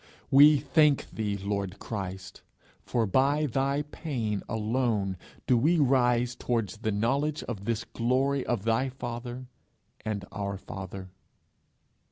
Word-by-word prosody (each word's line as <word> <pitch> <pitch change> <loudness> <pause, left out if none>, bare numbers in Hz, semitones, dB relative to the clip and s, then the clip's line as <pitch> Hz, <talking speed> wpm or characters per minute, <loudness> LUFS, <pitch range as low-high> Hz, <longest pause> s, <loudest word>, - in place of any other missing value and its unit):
We 145 +2 +8
thank 150 -1 +2
thee, 105 -2 -2
Lord 100 -1 -3
Christ, 95 -3 -6 0.4
for 115 -2 0
by 140 +8 +2
thy 140 +2 0
pain 120 - -3
alone 110 -3 0 0.3
do 125 - +4
we 155 +9 +3
rise 125 -4 +3
towards 115 -5 -2
the 110 0 -2
knowledge 140 +9 0
of 105 -5 -6
this 115 -1 -1
glory 130 +3 0
of 120 -5 -1
thy 115 +4 +1
rather 120 +1 -5 0.6
and 105 -2 -3
our 100 -1 -3
Father. 95 -1 -8
120 Hz, 125 wpm, -28 LUFS, 100-135 Hz, 0.6 s, We